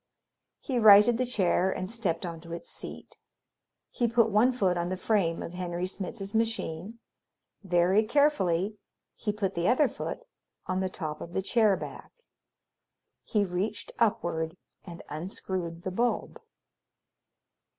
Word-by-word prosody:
He 255 Hz, -3 st, -1 dB
righted 215 Hz, +2 st, +8 dB
the 255 Hz, -, +1 dB
chair 190 Hz, -5 st, +2 dB
and 185 Hz, +1 st, -3 dB
stepped 190 Hz, -7 st, -2 dB
onto 165 Hz, 0 st, -7 dB
its 170 Hz, -, -7 dB
seat. -, -, -9 dB, 0.7 s
He 240 Hz, -, +1 dB
put 230 Hz, -1 st, +3 dB
one 220 Hz, +5 st, +5 dB
foot 195 Hz, -8 st, +1 dB
on 175 Hz, 0 st, -1 dB
the 185 Hz, -, -2 dB
frame 185 Hz, -4 st, +1 dB
of 170 Hz, -, -7 dB
Henry 180 Hz, 0 st, -3 dB
Smitz's 195 Hz, +2 st, -6 dB
machine; 220 Hz, -3 st, -2 dB, 0.7 s
very 180 Hz, +2 st, +3 dB
carefully 215 Hz, -, +2 dB, 0.4 s
he 210 Hz, -, -2 dB
put 200 Hz, -2 st, -2 dB
the 170 Hz, +1 st, 0 dB
other 270 Hz, +4 st, +4 dB
foot -, -, -6 dB, 0.4 s
on 185 Hz, 0 st, -1 dB
the 190 Hz, 0 st, 0 dB
top 155 Hz, -4 st, -5 dB
of 170 Hz, -, -8 dB
the 190 Hz, -, -1 dB
chair 215 Hz, -2 st, +3 dB
back. -, -, -8 dB, 1.1 s
He 210 Hz, -2 st, +1 dB
reached 190 Hz, +4 st, -3 dB
upward 170 Hz, -6 st, 0 dB, 0.3 s
and 170 Hz, -2 st, -10 dB
unscrewed 170 Hz, +1 st, -5 dB
the 185 Hz, -, -3 dB
bulb. 235 Hz, +6 st, -1 dB
190 Hz, 140 wpm, -28 LUFS, 175-220 Hz, 1.1 s, righted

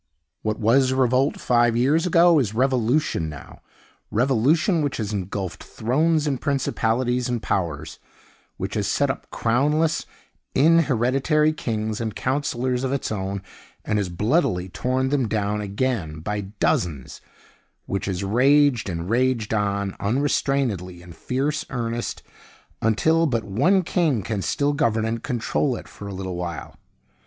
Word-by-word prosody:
What 110 Hz, 0 st, -1 dB
was 130 Hz, +4 st, +3 dB
revolt 130 Hz, +2 st, +2 dB
five 120 Hz, -1 st, +2 dB
years 150 Hz, +8 st, +2 dB
ago 170 Hz, -2 st, +5 dB
is 110 Hz, -5 st, -1 dB
Revolution 125 Hz, -, +1 dB
now 75 Hz, -2 st, -11 dB, 0.5 s
revolution 140 Hz, -, +2 dB
which 145 Hz, -2 st, -1 dB
has 105 Hz, -2 st, -3 dB
ingulfed 95 Hz, -1 st, -4 dB
thrones, 155 Hz, +7 st, 0 dB
and 140 Hz, -4 st, -1 dB
principalities, 125 Hz, -3 st, 0 dB
and 120 Hz, -1 st, -1 dB
powers; 85 Hz, -9 st, -3 dB, 0.6 s
which 95 Hz, +1 st, -4 dB
has 105 Hz, -3 st, -1 dB
set 140 Hz, +5 st, +2 dB
up -, -, -9 dB
crownless, 150 Hz, +7 st, +1 dB, 0.5 s
inhereditary 150 Hz, 0 st, +3 dB
kings 110 Hz, -6 st, -3 dB
and 110 Hz, -3 st, -3 dB
counselors 130 Hz, -2 st, -1 dB
of 130 Hz, -, -1 dB
its 140 Hz, -4 st, -2 dB
own, 100 Hz, -1 st, -3 dB, 0.4 s
and 105 Hz, -, +1 dB
has 95 Hz, -3 st, -2 dB
bloodily 95 Hz, -, 0 dB
torn 130 Hz, +6 st, -1 dB
them 135 Hz, -4 st, +1 dB
down 105 Hz, -1 st, -1 dB
again 100 Hz, -7 st, -2 dB
by 105 Hz, +4 st, -2 dB, 0.2 s
dozens; 75 Hz, -8 st, -1 dB, 0.6 s
which 100 Hz, 0 st, -3 dB
has 95 Hz, -1 st, -2 dB
raged 130 Hz, +2 st, +3 dB
and 85 Hz, -1 st, -4 dB
raged 120 Hz, -1 st, +1 dB
on 100 Hz, -2 st, -1 dB
unrestrainedly 115 Hz, -6 st, 0 dB
in 90 Hz, -, -12 dB
fierce 140 Hz, -, -2 dB
earnest, 120 Hz, -2 st, -3 dB, 0.6 s
until 160 Hz, +10 st, +3 dB
but 115 Hz, -5 st, 0 dB
one 140 Hz, -, +2 dB
king 160 Hz, -, +1 dB
can 105 Hz, -1 st, -2 dB
still 145 Hz, +8 st, 0 dB
govern 115 Hz, -7 st, +1 dB
and 115 Hz, 0 st, -2 dB
control 125 Hz, +1 st, -1 dB
it -, -, -9 dB
for 100 Hz, -, -10 dB
a 100 Hz, -, -6 dB
little 95 Hz, -1 st, -4 dB
while. 85 Hz, -4 st, -5 dB
120 Hz, 140 wpm, -23 LUFS, 100-140 Hz, 0.6 s, ago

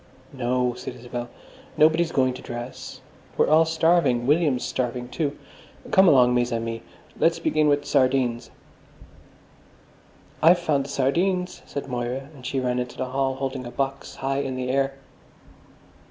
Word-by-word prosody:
"No," 125 Hz, -1 st, 0 dB
said 125 Hz, 0 st, -7 dB
Isabel, 120 Hz, 0 st, -6 dB, 0.5 s
"nobody's 160 Hz, +2 st, +4 dB
going 130 Hz, -1 st, +2 dB
to 130 Hz, -, -9 dB
dress. 120 Hz, +1 st, -8 dB, 0.4 s
We're -, -, +3 dB
all 160 Hz, +2 st, +6 dB
starving. 160 Hz, -6 st, +2 dB
William's 145 Hz, -3 st, +2 dB
starving, 125 Hz, -1 st, -3 dB
too. 145 Hz, -1 st, -2 dB, 0.5 s
Come 190 Hz, 0 st, +6 dB
along, 125 Hz, -5 st, +6 dB
mes 120 Hz, 0 st, +1 dB
amis, 115 Hz, 0 st, -3 dB, 0.4 s
let's 165 Hz, 0 st, +3 dB
begin 155 Hz, -2 st, +1 dB
with 145 Hz, 0 st, +2 dB
sardines." 130 Hz, -2 st, +1 dB, 1.9 s
"I've 170 Hz, +3 st, +7 dB
found 150 Hz, -5 st, 0 dB
the -, -, -9 dB
sardines," 180 Hz, +7 st, 0 dB
said 140 Hz, -, -5 dB
Moira, 125 Hz, +3 st, -4 dB
and 135 Hz, -4 st, -14 dB
she 135 Hz, +2 st, -2 dB
ran 125 Hz, -1 st, -1 dB
into 125 Hz, 0 st, -5 dB
the 130 Hz, -, -3 dB
hall, 135 Hz, 0 st, 0 dB
holding 135 Hz, -1 st, -4 dB
a -, -, -6 dB
box 135 Hz, +2 st, -4 dB
high 135 Hz, +1 st, -2 dB
in 135 Hz, -2 st, -3 dB
the 125 Hz, 0 st, -3 dB
air. 135 Hz, 0 st, 0 dB
135 Hz, 150 wpm, -24 LUFS, 125-150 Hz, 1.9 s, I've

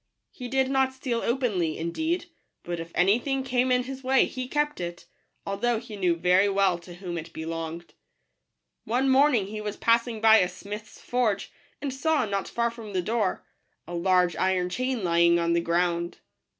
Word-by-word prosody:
He 250 Hz, -, -7 dB
did 265 Hz, +1 st, +1 dB
not 265 Hz, -1 st, +2 dB
steal 255 Hz, -3 st, -2 dB
openly, 210 Hz, -, 0 dB
indeed; 320 Hz, -, -2 dB, 0.4 s
but 175 Hz, -1 st, -4 dB
if 165 Hz, 0 st, -7 dB
any 195 Hz, +6 st, +4 dB
thing 270 Hz, +1 st, -2 dB
came 255 Hz, 0 st, +1 dB
in 250 Hz, 0 st, +3 dB
his 265 Hz, +1 st, -7 dB
way, 265 Hz, +1 st, +4 dB
he 255 Hz, -1 st, -5 dB
kept 295 Hz, -3 st, -1 dB
it, 175 Hz, 0 st, -6 dB, 0.4 s
although 225 Hz, +4 st, 0 dB
he 225 Hz, -1 st, -8 dB
knew 180 Hz, -4 st, +1 dB
very 180 Hz, +4 st, +3 dB
well 195 Hz, -3 st, +2 dB
to 175 Hz, 0 st, -12 dB
whom 175 Hz, -2 st, -5 dB
it 165 Hz, +1 st, -9 dB
belonged. 165 Hz, +1 st, -5 dB, 0.9 s
One 250 Hz, +4 st, 0 dB
morning 265 Hz, -5 st, +4 dB
he 215 Hz, +2 st, -6 dB
was 210 Hz, 0 st, -4 dB
passing 230 Hz, 0 st, +2 dB
by 220 Hz, 0 st, +7 dB
a 180 Hz, -4 st, +3 dB
smith's 210 Hz, +3 st, -9 dB
forge, 235 Hz, -5 st, -1 dB, 0.3 s
and 275 Hz, -2 st, -2 dB
saw, 305 Hz, +1 st, +1 dB
not 200 Hz, -2 st, -2 dB
far 235 Hz, 0 st, 0 dB
from 225 Hz, -3 st, -9 dB
the 185 Hz, -1 st, 0 dB
door, 215 Hz, -2 st, -1 dB, 0.4 s
a 175 Hz, -, -7 dB
large 180 Hz, 0 st, +2 dB
iron 185 Hz, -1 st, +1 dB
chain 255 Hz, +3 st, -2 dB
lying 170 Hz, 0 st, +4 dB
on 170 Hz, 0 st, +1 dB
the 170 Hz, -, +2 dB
ground. 170 Hz, 0 st, 0 dB
210 Hz, 180 wpm, -26 LUFS, 175-250 Hz, 0.9 s, by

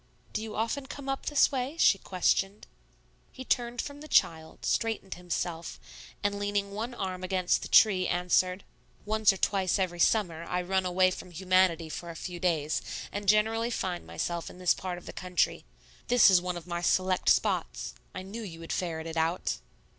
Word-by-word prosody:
"Do 215 Hz, -, -1 dB
you 220 Hz, -1 st, -6 dB
often 230 Hz, +5 st, -2 dB
come 280 Hz, -1 st, -8 dB
up 270 Hz, 0 st, -3 dB
this 295 Hz, 0 st, +4 dB
way?" 270 Hz, +3 st, -3 dB
she 200 Hz, -11 st, +5 dB
questioned. 195 Hz, +3 st, 0 dB, 0.7 s
He 260 Hz, -, -9 dB
turned 240 Hz, -1 st, 0 dB
from 285 Hz, 0 st, -8 dB
the 305 Hz, -, -9 dB
child, 160 Hz, -, +1 dB
straightened 225 Hz, -4 st, -1 dB
himself, 175 Hz, -1 st, -4 dB, 0.4 s
and 200 Hz, 0 st, 0 dB
leaning 205 Hz, 0 st, -1 dB
one 230 Hz, +4 st, -4 dB
arm 185 Hz, -3 st, -4 dB
against 185 Hz, -1 st, +1 dB
the -, -, -5 dB
tree, 190 Hz, -4 st, +5 dB
answered, 180 Hz, +1 st, +1 dB, 0.4 s
"Once 215 Hz, 0 st, +4 dB
or 195 Hz, -, -5 dB
twice 190 Hz, -1 st, +1 dB
every 180 Hz, -3 st, -1 dB
summer 170 Hz, -4 st, +2 dB
I 180 Hz, +1 st, -2 dB
run 190 Hz, +1 st, 0 dB
away 185 Hz, +1 st, +3 dB
from 185 Hz, -, -7 dB
humanity 180 Hz, -1 st, +2 dB
for 170 Hz, +2 st, -6 dB
a 165 Hz, -, -7 dB
few 175 Hz, +1 st, -6 dB
days, 160 Hz, -4 st, 0 dB, 0.3 s
and 205 Hz, -1 st, -2 dB
generally 220 Hz, +2 st, +3 dB
find 185 Hz, -6 st, -3 dB
myself 170 Hz, -1 st, -3 dB
in -, -, -13 dB
this 180 Hz, -1 st, +3 dB
part 185 Hz, -1 st, -5 dB
of 175 Hz, -, -12 dB
the -, -, -8 dB
country. 180 Hz, -2 st, -1 dB, 0.4 s
This 240 Hz, -4 st, +6 dB
is 180 Hz, -2 st, +5 dB
one 180 Hz, -1 st, -3 dB
of 170 Hz, -, -9 dB
my 175 Hz, -1 st, -3 dB
select 185 Hz, +1 st, +2 dB
spots. -, -, +1 dB, 0.2 s
I 185 Hz, -, -5 dB
knew 205 Hz, +5 st, -7 dB
you 170 Hz, -7 st, -8 dB
would 165 Hz, -, -5 dB
ferret 165 Hz, -3 st, -3 dB
it 165 Hz, 0 st, -5 dB
out." 165 Hz, +3 st, 0 dB
185 Hz, 185 wpm, -29 LUFS, 175-215 Hz, 0.7 s, This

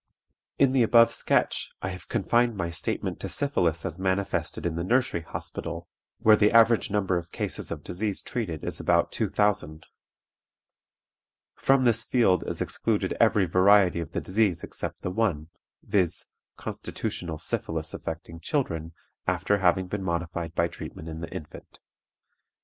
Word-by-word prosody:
"In 135 Hz, -2 st, +4 dB
the 130 Hz, -1 st, +3 dB
above 115 Hz, 0 st, +6 dB
sketch -, -, 0 dB
I 95 Hz, -, -1 dB
have 90 Hz, -4 st, -8 dB
confined 120 Hz, -1 st, +2 dB
my 85 Hz, -3 st, -2 dB
statement 80 Hz, -, -3 dB
to -, -, -5 dB
syphilis 85 Hz, -, 0 dB
as 85 Hz, -, -4 dB
manifested 95 Hz, 0 st, -1 dB
in 85 Hz, -, 0 dB
the 85 Hz, -, -2 dB
Nursery 120 Hz, -3 st, +1 dB
Hospital, 80 Hz, -, -6 dB, 0.3 s
where 110 Hz, -1 st, +6 dB
the 105 Hz, 0 st, +4 dB
average 115 Hz, 0 st, +5 dB
number 95 Hz, -3 st, +1 dB
of 85 Hz, 0 st, -12 dB
cases -, -, -4 dB
of -, -, -5 dB
disease 100 Hz, +3 st, -3 dB
treated 90 Hz, -11 st, -4 dB
is -, -, -4 dB
about -, -, +2 dB
two -, -, -1 dB
thousand. 100 Hz, -7 st, 0 dB, 1.7 s
From 135 Hz, -1 st, +3 dB
this 115 Hz, -1 st, +3 dB
field 110 Hz, -7 st, +3 dB
is -, -, -3 dB
excluded -, -, -1 dB
every 100 Hz, -3 st, +4 dB
variety 95 Hz, 0 st, +5 dB
of 85 Hz, -, -5 dB
the -, -, -1 dB
disease 95 Hz, -3 st, +1 dB
except -, -, -6 dB
the 90 Hz, -, -2 dB
one, 90 Hz, -7 st, 0 dB, 0.3 s
viz., 95 Hz, -5 st, 0 dB, 0.3 s
constitutional 85 Hz, -3 st, -5 dB
syphilis 80 Hz, 0 st, -3 dB
affecting 80 Hz, 0 st, -6 dB
children 85 Hz, -, -2 dB, 0.3 s
after 90 Hz, +3 st, +1 dB
having 95 Hz, 0 st, +3 dB
been 100 Hz, +2 st, -4 dB
modified 85 Hz, -2 st, -3 dB
by 85 Hz, -, +2 dB
treatment 80 Hz, -1 st, -8 dB
in 80 Hz, 0 st, -6 dB
the 80 Hz, -, -5 dB
infant. 75 Hz, -, -10 dB
95 Hz, 150 wpm, -27 LUFS, 85-110 Hz, 1.7 s, above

